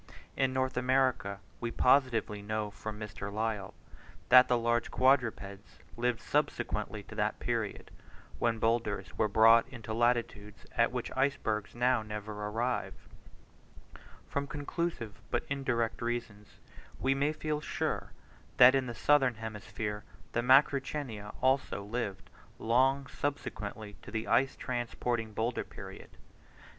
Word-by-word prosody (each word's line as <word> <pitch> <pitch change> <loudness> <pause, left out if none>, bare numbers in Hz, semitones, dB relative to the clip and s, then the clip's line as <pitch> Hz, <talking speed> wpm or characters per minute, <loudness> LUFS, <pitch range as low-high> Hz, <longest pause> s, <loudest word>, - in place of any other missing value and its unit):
In 135 -1 +2
North 130 -1 -1
America 125 -6 +1 0.2
we 120 - -2
positively 115 -5 +2
know 105 0 -3
from 105 +1 -7
Mr. 105 -1 -6
Lyell, 105 -2 -2 0.5
that 125 0 +9
the 125 - +3
large 120 0 +1
quadrupeds 115 -6 +1 0.2
lived 120 0 0
subsequently - - -1
to - - -12
that - - -1
period, - - -3 0.5
when 115 -1 +1
boulders 110 -5 -1
were 110 - +2
brought 115 +3 +6
into 115 -4 -7
latitudes 115 -2 0
at 115 0 +3
which 125 -1 -4
icebergs 110 -6 0
now 125 0 +2
never 105 0 -6
arrive: 110 +4 -2 1.3
from 140 0 -2
conclusive 145 - -4
but - - -1
indirect 130 -5 -1
reasons 115 -3 -4 0.4
we 135 - +2
may 140 +2 +1
feel 155 -1 -3
sure, - - -2 0.5
that 125 +1 +9
in 135 -2 +1
the 120 - -5
southern 135 -4 +3
hemisphere 105 -1 -5 0.3
the 120 - 0
Macrauchenia, 130 -4 +2
also, 130 -6 +1
lived 105 -2 -4 0.3
long 130 +4 +2
subsequently 110 -7 -5
to - - -11
the 110 +1 -3
ice 135 +1 +3
transporting 120 -2 -2
boulder 115 +3 -1
period. - - -10
120 Hz, 125 wpm, -31 LUFS, 105-130 Hz, 1.3 s, that